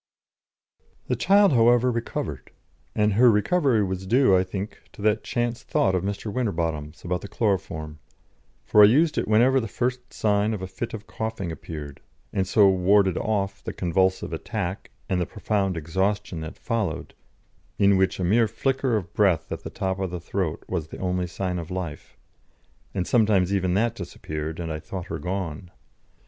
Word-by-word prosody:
_ -, -, -33 dB
The -, -, +2 dB
child, 200 Hz, -3 st, +4 dB
however, 120 Hz, +1 st, +5 dB
recovered, 115 Hz, 0 st, -4 dB, 0.5 s
and 105 Hz, -1 st, +2 dB
her 120 Hz, +4 st, +6 dB
recovery 115 Hz, -, +3 dB
was 95 Hz, 0 st, -3 dB
due, 120 Hz, -3 st, +5 dB
I 90 Hz, -, +4 dB
think, 95 Hz, +2 st, -6 dB
to -, -, -11 dB
that 110 Hz, 0 st, +2 dB
chance 120 Hz, 0 st, -2 dB
thought 95 Hz, -, +1 dB
of 90 Hz, -, +1 dB
Mr. 100 Hz, +1 st, -3 dB
Winterbotham's 80 Hz, -10 st, -2 dB
about 90 Hz, 0 st, -1 dB
the -, -, -7 dB
chloroform, 90 Hz, -9 st, -2 dB, 0.7 s
for 105 Hz, -, +5 dB
I 105 Hz, -, +10 dB
used 150 Hz, +8 st, +3 dB
it -, -, -2 dB
whenever 120 Hz, +5 st, +4 dB
the 115 Hz, -, -3 dB
first 125 Hz, +3 st, -3 dB
sign 105 Hz, +1 st, +1 dB
of 100 Hz, -, -7 dB
a -, -, -3 dB
fit 115 Hz, +5 st, -5 dB
of 105 Hz, -1 st, -9 dB
coughing 110 Hz, -6 st, -4 dB
appeared, 75 Hz, -3 st, -8 dB, 0.3 s
and 95 Hz, -1 st, 0 dB
so 100 Hz, +1 st, +5 dB
warded 95 Hz, 0 st, +4 dB
off 100 Hz, -2 st, -1 dB
the -, -, -5 dB
convulsive 95 Hz, 0 st, 0 dB
attack 95 Hz, +2 st, -4 dB, 0.2 s
and 90 Hz, -1 st, 0 dB
the 85 Hz, -, -1 dB
profound 100 Hz, -4 st, -1 dB
exhaustion 95 Hz, +3 st, -1 dB
that 80 Hz, 0 st, -7 dB
followed, 115 Hz, -4 st, -2 dB, 0.6 s
in 100 Hz, 0 st, +5 dB
which 95 Hz, 0 st, +1 dB
a -, -, -1 dB
mere 110 Hz, +6 st, +3 dB
flicker 130 Hz, +1 st, 0 dB
of 85 Hz, -4 st, -6 dB
breath 95 Hz, -6 st, +2 dB
at -, -, -4 dB
the -, -, -6 dB
top 95 Hz, 0 st, -2 dB
of 95 Hz, -1 st, -1 dB
the 90 Hz, 0 st, -5 dB
throat 90 Hz, -1 st, -3 dB
was 80 Hz, -2 st, -3 dB
the -, -, -9 dB
only 90 Hz, -1 st, -1 dB
sign 90 Hz, 0 st, -3 dB
of 85 Hz, -1 st, -7 dB
life, 90 Hz, -5 st, -6 dB, 0.8 s
and 90 Hz, -2 st, 0 dB
sometimes 105 Hz, -5 st, +3 dB
even 95 Hz, -2 st, +1 dB
that 115 Hz, +3 st, +2 dB
disappeared, 75 Hz, +1 st, -6 dB
and 85 Hz, -2 st, -4 dB
I 75 Hz, -, -4 dB
thought 95 Hz, +3 st, -7 dB
her -, -, -3 dB
gone. 90 Hz, -3 st, -4 dB
95 Hz, 180 wpm, -25 LUFS, 90-110 Hz, 0.8 s, I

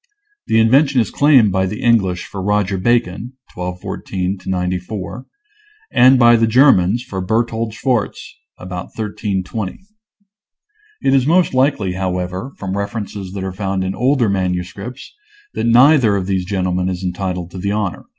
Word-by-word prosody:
The 110 Hz, -, +3 dB
invention 135 Hz, +4 st, +4 dB
is 115 Hz, -, 0 dB
claimed 135 Hz, -8 st, +4 dB
by 95 Hz, 0 st, +1 dB
the 105 Hz, +3 st, -6 dB
English 95 Hz, -7 st, +2 dB
for 95 Hz, -, -7 dB
Roger 100 Hz, -1 st, 0 dB
Bacon 120 Hz, +2 st, 0 dB, 0.2 s
(1214 90 Hz, +1 st, -4 dB
94), 90 Hz, +5 st, -4 dB, 0.6 s
and 130 Hz, +2 st, +6 dB
by 120 Hz, -1 st, +6 dB
the 115 Hz, 0 st, +2 dB
Germans 120 Hz, -3 st, +4 dB
for 95 Hz, -7 st, -5 dB
Berthold 115 Hz, +2 st, -1 dB
Schwarz 120 Hz, -4 st, -1 dB, 0.4 s
(about 90 Hz, -1 st, -6 dB
1320). 100 Hz, -, -4 dB, 1.2 s
It 135 Hz, -, +3 dB
is 135 Hz, -1 st, +3 dB
most 170 Hz, -1 st, +3 dB
likely, 130 Hz, -8 st, +1 dB
however, 90 Hz, +5 st, -3 dB
from 95 Hz, -1 st, -4 dB
references 100 Hz, -2 st, -5 dB
that 95 Hz, -1 st, -5 dB
are 95 Hz, -, -3 dB
found 95 Hz, 0 st, -2 dB
in 95 Hz, 0 st, -2 dB
older 125 Hz, +2 st, +1 dB
manuscripts, 95 Hz, +5 st, -4 dB, 0.4 s
that -, -, -2 dB
neither 125 Hz, -2 st, +5 dB
of 95 Hz, -2 st, -2 dB
these 95 Hz, -1 st, -1 dB
gentlemen 90 Hz, -1 st, -1 dB
is 90 Hz, 0 st, -4 dB
entitled 90 Hz, -1 st, -3 dB
to 95 Hz, -, -8 dB
the 100 Hz, +2 st, -2 dB
honor. 105 Hz, -3 st, -3 dB
100 Hz, 145 wpm, -18 LUFS, 95-120 Hz, 1.2 s, and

